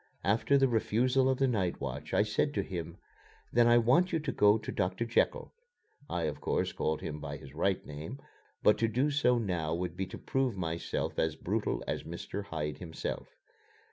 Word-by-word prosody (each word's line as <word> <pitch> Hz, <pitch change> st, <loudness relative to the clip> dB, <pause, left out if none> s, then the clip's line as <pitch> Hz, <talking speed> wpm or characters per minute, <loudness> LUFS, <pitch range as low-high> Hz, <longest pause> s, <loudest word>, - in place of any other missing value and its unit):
After 110 Hz, -, +3 dB
the 135 Hz, 0 st, +4 dB
refusal 125 Hz, +3 st, +2 dB
of 130 Hz, -, +2 dB
the 135 Hz, -, +3 dB
night 95 Hz, -8 st, 0 dB
watch, -, -, -5 dB
I -, -, +4 dB
said 110 Hz, +7 st, 0 dB
to -, -, +1 dB
him: 85 Hz, -4 st, -5 dB, 0.6 s
"Then 120 Hz, 0 st, +5 dB
I 120 Hz, 0 st, +6 dB
want 130 Hz, +11 st, +4 dB
you 165 Hz, -, +2 dB
to -, -, -2 dB
go 105 Hz, +1 st, +5 dB
to -, -, -6 dB
Doctor 100 Hz, +4 st, -1 dB
Jekyll" 115 Hz, -, +1 dB, 0.6 s
(I, 85 Hz, -, -1 dB
of 75 Hz, -2 st, -3 dB
course, -, -, 0 dB
called 80 Hz, 0 st, -1 dB
him 75 Hz, 0 st, -5 dB
by -, -, -5 dB
his 70 Hz, -, -12 dB
right 95 Hz, +5 st, 0 dB
name; 75 Hz, -, -7 dB, 0.5 s
but 105 Hz, -, +5 dB
to 115 Hz, -, +3 dB
do 130 Hz, +7 st, +1 dB
so 135 Hz, -4 st, +3 dB
now 90 Hz, -8 st, -1 dB
would 90 Hz, -1 st, -3 dB
be 95 Hz, 0 st, -2 dB
to 95 Hz, -, -8 dB
prove 130 Hz, -6 st, -1 dB
myself 85 Hz, -2 st, -2 dB
as -, -, +1 dB
brutal -, -, -1 dB
as -, -, -1 dB
Mr. 100 Hz, 0 st, -6 dB
Hyde 75 Hz, -5 st, -4 dB
himself). 80 Hz, -3 st, -5 dB
105 Hz, 195 wpm, -31 LUFS, 85-125 Hz, 0.6 s, I